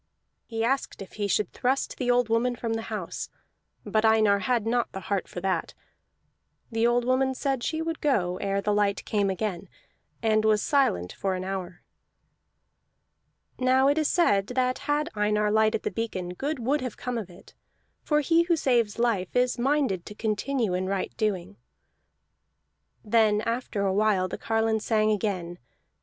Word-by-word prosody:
He 225 Hz, -1 st, -2 dB
asked 270 Hz, +4 st, -1 dB
if 190 Hz, -, -15 dB
he 205 Hz, -1 st, -2 dB
should 200 Hz, 0 st, 0 dB
thrust 260 Hz, +2 st, -1 dB
the 250 Hz, -2 st, -1 dB
woman 245 Hz, 0 st, +2 dB
from 230 Hz, -1 st, -3 dB
the 225 Hz, -, -2 dB
house, -, -, -5 dB, 0.6 s
but 215 Hz, 0 st, +1 dB
Einar 215 Hz, -2 st, +4 dB
had 230 Hz, +2 st, 0 dB
not 235 Hz, +1 st, 0 dB
the 190 Hz, -, -4 dB
heart 195 Hz, -1 st, -2 dB
for 175 Hz, -, -7 dB
that. 185 Hz, -3 st, -1 dB, 1.0 s
The 225 Hz, +1 st, +2 dB
old 240 Hz, 0 st, +2 dB
woman 260 Hz, +1 st, +1 dB
said 270 Hz, -2 st, -1 dB
she 315 Hz, +5 st, -2 dB
would 330 Hz, -1 st, -4 dB
go 185 Hz, -11 st, +1 dB
ere 195 Hz, 0 st, -1 dB
the 210 Hz, +1 st, 0 dB
light 205 Hz, -1 st, +1 dB
came 205 Hz, -2 st, +1 dB
again, 190 Hz, -1 st, -3 dB, 0.5 s
and 215 Hz, -1 st, +3 dB
was 215 Hz, -1 st, +3 dB
silent 180 Hz, -, +1 dB
for 190 Hz, -1 st, -2 dB
an 185 Hz, -, -4 dB
hour. 185 Hz, -2 st, -5 dB, 1.8 s
Now 260 Hz, +1 st, +4 dB
it 290 Hz, +2 st, +2 dB
is 310 Hz, -, +2 dB
said 205 Hz, -, +2 dB
that 255 Hz, +1 st, 0 dB
had 295 Hz, +1 st, +1 dB
Einar 210 Hz, 0 st, +1 dB
lighted 220 Hz, 0 st, +2 dB
the -, -, -2 dB
beacon, 200 Hz, -6 st, -3 dB
good 285 Hz, -, -3 dB
would 265 Hz, +5 st, 0 dB
have 255 Hz, -3 st, -5 dB
come 250 Hz, -2 st, -3 dB
of 200 Hz, -5 st, -7 dB
it; 175 Hz, -, -16 dB, 0.5 s
for 300 Hz, -1 st, +1 dB
he 330 Hz, +3 st, +3 dB
who 340 Hz, 0 st, +2 dB
saves 240 Hz, -8 st, +1 dB
life 230 Hz, -6 st, 0 dB
is 250 Hz, 0 st, +2 dB
minded 260 Hz, -9 st, 0 dB
to 210 Hz, -, -8 dB
continue 220 Hz, 0 st, -1 dB
in 185 Hz, +1 st, -1 dB
right 195 Hz, -1 st, -2 dB
doing. 190 Hz, -, -2 dB, 1.5 s
Then 215 Hz, -1 st, +3 dB
after 230 Hz, -3 st, -2 dB
a 190 Hz, -, +1 dB
while 200 Hz, -2 st, +2 dB
the 185 Hz, -, -6 dB
carline 225 Hz, 0 st, +1 dB
sang 215 Hz, 0 st, +1 dB
again. 185 Hz, -4 st, -2 dB
220 Hz, 170 wpm, -26 LUFS, 200-250 Hz, 1.8 s, Einar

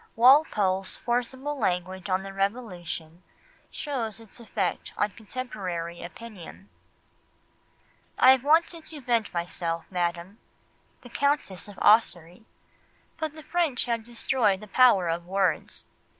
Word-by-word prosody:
Walpole's 215 Hz, -7 st, +4 dB
forcible 260 Hz, +4 st, -2 dB
language 185 Hz, +1 st, -1 dB
on 185 Hz, +1 st, +1 dB
the 195 Hz, 0 st, -8 dB
Revolution 185 Hz, -5 st, -3 dB, 0.5 s
shows 250 Hz, -8 st, -4 dB
its 225 Hz, -1 st, -14 dB
effect 210 Hz, -5 st, -3 dB
on 205 Hz, -, +1 dB
contemporary 190 Hz, -7 st, -5 dB
opinion: 195 Hz, +1 st, -10 dB, 1.5 s
"I 260 Hz, -, +8 dB
have 260 Hz, -1 st, +3 dB
wanted 325 Hz, +2 st, +2 dB
to 310 Hz, -, -7 dB
vent 235 Hz, -4 st, 0 dB
myself, 170 Hz, -1 st, -3 dB
Madam 175 Hz, +3 st, -2 dB, 0.6 s
[the 245 Hz, -, -13 dB
Countess 280 Hz, -9 st, -1 dB
of 205 Hz, -, -12 dB
Ossory], 180 Hz, -3 st, +3 dB, 0.7 s
but 315 Hz, -2 st, -2 dB
the 310 Hz, 0 st, -11 dB
French 315 Hz, -6 st, 0 dB
have 230 Hz, -2 st, -1 dB
destroyed 235 Hz, -3 st, +1 dB
the 215 Hz, -, -10 dB
power 205 Hz, -5 st, +5 dB
of 170 Hz, +1 st, -2 dB
words. 190 Hz, -4 st, -1 dB
210 Hz, 120 wpm, -27 LUFS, 180-255 Hz, 1.5 s, I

